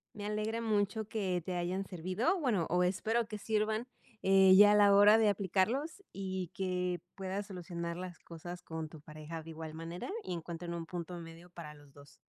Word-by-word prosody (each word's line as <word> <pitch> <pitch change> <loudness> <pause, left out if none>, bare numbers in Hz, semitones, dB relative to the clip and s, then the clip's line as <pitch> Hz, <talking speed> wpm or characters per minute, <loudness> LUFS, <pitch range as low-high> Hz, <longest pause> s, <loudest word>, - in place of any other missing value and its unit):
Me 205 -1 -6
alegra 215 +2 -1
mucho 215 -1 0
que 190 -5 -1
te 185 -1 -3
hayan 180 +3 -1
servido, 185 - 0
bueno, 225 - +1
o 180 +1 +3
espero 220 +5 +1
que 210 - -4
sirvan, 215 +3 0 0.3
eh, 190 0 +6
ya 205 0 +9
a - - +5
la 205 -1 +6
hora 205 +2 +8
de 220 -2 +4
aplicarlos 215 - 0
y 190 -3 -4
que 180 -3 -1 0.2
puedas 195 +1 -4
solucionar 170 -3 -5
las 180 -1 -7
cosas 175 +2 -9
con 160 -2 -6
tu 155 -1 -11
pareja 155 +1 -8
de 165 +1 -10
igual 160 -1 -7
manera 165 - -6
y - - -4
encuentren 170 +1 -5
un 165 -1 -4
punto 175 0 -6
medio 165 +1 -11
para 165 -4 -9
los 145 -1 -18
2. 140 0 -16
185 Hz, 190 wpm, -33 LUFS, 170-210 Hz, 0.3 s, ya